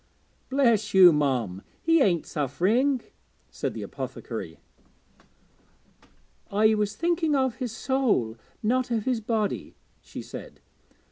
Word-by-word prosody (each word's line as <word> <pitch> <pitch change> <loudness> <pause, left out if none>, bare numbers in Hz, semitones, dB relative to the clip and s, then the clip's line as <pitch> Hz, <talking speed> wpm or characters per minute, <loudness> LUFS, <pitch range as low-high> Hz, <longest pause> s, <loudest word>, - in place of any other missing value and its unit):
'Bless 235 -7 +2
you, 180 -3 +9
mum, 125 -11 0 0.2
he 330 -1 +3
ain't 175 - +2
suff'ring,' 215 - +1 0.5
said - - -4
the - - -5
apothecary. - - -6 1.9
'I 215 +1 +4
was 210 -1 -1
thinking 335 -3 +1
of 260 -3 +1
his 250 -4 -3
soul, 235 - 0 0.3
not 250 +3 +1
of 225 -3 -1
his 250 -3 0
body,' 215 -2 -2 0.3
she - - -9
said. - - -10
220 Hz, 115 wpm, -26 LUFS, 185-260 Hz, 1.9 s, you